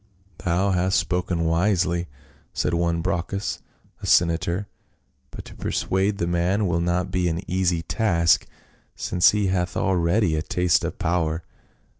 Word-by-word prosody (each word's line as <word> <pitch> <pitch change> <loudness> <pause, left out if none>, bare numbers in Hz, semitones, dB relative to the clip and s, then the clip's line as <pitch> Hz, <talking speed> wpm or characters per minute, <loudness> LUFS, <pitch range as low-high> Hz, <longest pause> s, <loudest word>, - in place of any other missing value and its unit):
"Thou 90 +3 +1
hast 95 +1 +1
spoken 90 -1 -1
wisely." 85 +1 +1 0.5
said - - -1
one 85 0 0
Brocchus, 95 +1 -2 0.4
a - - -5
senator, 85 +3 +2 0.3
" 65 0 -44
but - - -10
to - - -11
persuade 95 +2 -1
the 85 - -1
man 85 +4 +1
will 85 -2 0
not 90 +2 -1
be 90 -1 0
an 85 0 -1
easy 90 -2 0
task, 85 -7 +2 0.5
since 90 - +3
he 105 -2 +1
hath 90 0 -1
had - - 0
already 90 -1 +2
a 75 - 0
taste 85 -2 +1
of - - -4
power." 80 -1 -1
90 Hz, 150 wpm, -24 LUFS, 85-95 Hz, 0.5 s, since